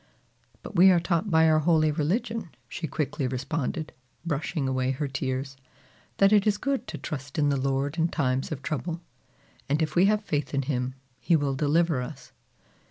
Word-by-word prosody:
"But -, -, -9 dB
we 185 Hz, +2 st, +8 dB
are 180 Hz, -2 st, +5 dB
taught 170 Hz, +3 st, 0 dB
by 160 Hz, -2 st, +5 dB
our 155 Hz, 0 st, +4 dB
holy 155 Hz, -1 st, +3 dB
religion," 205 Hz, +7 st, -1 dB, 0.2 s
she 165 Hz, -, -5 dB
quickly 145 Hz, -1 st, -2 dB
responded, 150 Hz, +4 st, -3 dB, 0.3 s
brushing 150 Hz, -2 st, -2 dB
away 130 Hz, -1 st, 0 dB
her 135 Hz, +2 st, -1 dB
tears, 135 Hz, 0 st, -3 dB, 0.6 s
"that 195 Hz, +1 st, +5 dB
it 210 Hz, 0 st, +4 dB
is 205 Hz, -1 st, +3 dB
good 275 Hz, +3 st, -2 dB
to -, -, -5 dB
trust 135 Hz, -3 st, -6 dB
in 145 Hz, -1 st, +3 dB
the 140 Hz, -, +2 dB
Lord 140 Hz, +3 st, -1 dB
in 165 Hz, -, +3 dB
times 135 Hz, -5 st, -1 dB
of 145 Hz, -2 st, -5 dB
trouble, 165 Hz, +3 st, -3 dB, 0.7 s
and 145 Hz, +2 st, +2 dB
if 155 Hz, -1 st, -1 dB
we 180 Hz, +2 st, +5 dB
have 210 Hz, +1 st, +2 dB
faith 145 Hz, -1 st, -2 dB
in 140 Hz, -, +1 dB
him, 125 Hz, -1 st, -2 dB, 0.2 s
he 170 Hz, -, +2 dB
will 145 Hz, -3 st, +1 dB
deliver 150 Hz, +1 st, +2 dB
us." 135 Hz, +2 st, -8 dB
155 Hz, 180 wpm, -27 LUFS, 135-170 Hz, 0.7 s, we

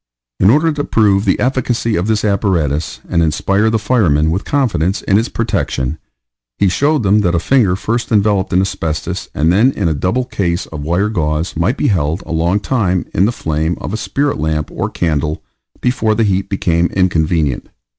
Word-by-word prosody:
In 95 Hz, -, +5 dB
order 155 Hz, +7 st, +3 dB
to 145 Hz, -1 st, -2 dB
prove 105 Hz, -5 st, +2 dB
the 95 Hz, -, +1 dB
efficacy 125 Hz, -3 st, 0 dB
of 90 Hz, +4 st, -1 dB
this 110 Hz, -1 st, 0 dB
apparatus, 85 Hz, -8 st, 0 dB
and 85 Hz, -, +1 dB
inspire 100 Hz, +7 st, +1 dB
the 115 Hz, -, +1 dB
firemen 90 Hz, -, +2 dB
with 95 Hz, +5 st, -2 dB
confidence 100 Hz, -, 0 dB
in 100 Hz, +1 st, +3 dB
its 115 Hz, -, -2 dB
protection, 65 Hz, +4 st, -2 dB, 0.6 s
he 100 Hz, -, +3 dB
showed 145 Hz, -, +1 dB
them 100 Hz, +2 st, +3 dB
that 90 Hz, -3 st, +1 dB
a -, -, +2 dB
finger 105 Hz, -3 st, +2 dB
first 115 Hz, +5 st, -2 dB
enveloped 100 Hz, -3 st, +2 dB
in 90 Hz, 0 st, +3 dB
asbestos, 85 Hz, -1 st, -3 dB
and 80 Hz, +3 st, +2 dB
then 115 Hz, +8 st, +4 dB
in 100 Hz, -8 st, -2 dB
a 80 Hz, -, +1 dB
double 95 Hz, -, -1 dB
case 90 Hz, -8 st, -2 dB
of 75 Hz, -2 st, -8 dB
wire 85 Hz, +8 st, 0 dB
gauze, 80 Hz, -4 st, -2 dB
might 95 Hz, -, 0 dB
be 145 Hz, -, +1 dB
held 80 Hz, -4 st, 0 dB
a -, -, -8 dB
long 85 Hz, +5 st, +1 dB
time 100 Hz, -6 st, 0 dB
in 95 Hz, -, +3 dB
the 110 Hz, -, +1 dB
flame 80 Hz, -5 st, -2 dB
of -, -, -5 dB
a -, -, 0 dB
spirit 140 Hz, +5 st, -1 dB
lamp 75 Hz, -1 st, -2 dB
or -, -, -3 dB
candle 75 Hz, -2 st, -2 dB, 0.4 s
before 115 Hz, -3 st, +1 dB
the 115 Hz, -, +1 dB
heat 95 Hz, -2 st, 0 dB
became 85 Hz, -3 st, +1 dB
inconvenient. 80 Hz, -7 st, 0 dB
95 Hz, 190 wpm, -16 LUFS, 80-110 Hz, 0.6 s, In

